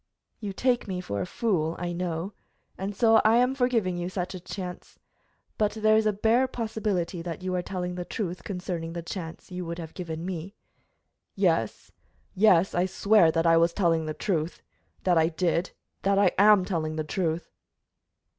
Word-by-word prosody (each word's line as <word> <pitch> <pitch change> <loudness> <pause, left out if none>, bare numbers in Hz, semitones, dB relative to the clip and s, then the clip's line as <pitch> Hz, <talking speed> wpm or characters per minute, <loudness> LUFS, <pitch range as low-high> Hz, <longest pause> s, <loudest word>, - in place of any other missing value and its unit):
"You 205 -3 -4
take 245 +4 0
me 185 -2 -3
for 100 - -3
a 90 - -3
fool, 170 -8 0
I 175 0 -3
know, 175 +2 -3 0.4
and 195 +2 -4
so 225 0 +5
I 220 +1 +5
am 250 +2 +3
for 250 -2 +2
giving 205 -8 0
you 175 +1 -3
such 180 -1 -3
a 185 - -6
chance; 180 0 -7 0.6
but 210 -1 +2
there 215 0 +3
is 220 0 +3
the 215 - +4
bare 225 +5 +2
possibility 215 -8 -2
that 170 +1 -6
you 185 0 -2
are 180 - 0
telling 180 -1 -4
the 180 0 -4
truth 180 -1 -4
concerning 180 -4 -4
the 170 -1 -5
chance 165 0 -7
you 180 0 -4
would 170 0 -4
have 165 -2 -7
given 165 -2 -5
me." 185 +2 -5 0.8
"Yes, - - 0 0.4
yes, 190 -3 +4
I 175 +1 +2
swear 200 -2 +4
that 165 +1 0
I 165 0 +6
was 170 +1 +3
telling 165 -5 +1
the 155 - -3
truth 170 -4 -2 0.4
that 175 -3 +4
I 160 - +4
did 170 +2 0 0.3
that 195 0 +2
I 200 -3 +5
am 205 -2 +6
telling 160 -5 -2
the 155 - -1
truth!" 165 +1 -2
180 Hz, 185 wpm, -27 LUFS, 170-205 Hz, 0.8 s, I